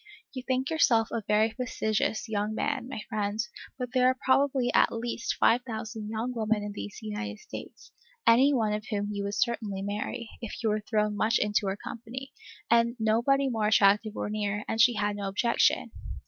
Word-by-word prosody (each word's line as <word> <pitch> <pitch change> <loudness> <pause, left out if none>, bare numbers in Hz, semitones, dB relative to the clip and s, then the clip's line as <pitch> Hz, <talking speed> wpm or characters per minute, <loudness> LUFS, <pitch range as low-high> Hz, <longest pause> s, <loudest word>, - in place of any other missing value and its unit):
You 260 - -5
think 260 +3 -1
yourself 235 -8 +3
a 230 - -2
very 215 +1 +3
fastidious 220 -3 -1
young 215 0 -1
man, 265 0 -1
my 235 - -5
friend; 210 -2 -2 0.4
but 250 -2 -4
there 255 -1 +4
are 260 0 +2
probably 265 -1 +3
at - - +4
least 230 0 -3
five 240 +2 +4
thousand 220 -2 -6
young 225 +3 -3
women 220 -2 0
in 205 - -4
these 205 0 -7
United 220 +1 -4
States, - - -10 0.3
any 255 +5 +6
one 220 -6 +1
of 210 +1 -4
whom 205 -2 -2
you 200 -1 -3
would 200 +1 -3
certainly 215 -4 -1
marry, 210 +4 -4
if 230 0 -6
you 220 - +2
were 215 0 0
thrown 210 -1 0
much 220 +3 +2
into 210 -1 +1
her 190 +1 -1
company, 250 +6 -8 0.3
and 235 +1 +3
nobody 235 +5 +2
more 220 -4 0
attractive 210 +1 +4
were - - -3
near, 210 -1 -2
and 225 - +1
she 240 0 +5
had 205 0 -1
no 200 -1 -3
objection. 220 +5 +2
220 Hz, 190 wpm, -28 LUFS, 210-245 Hz, 0.4 s, any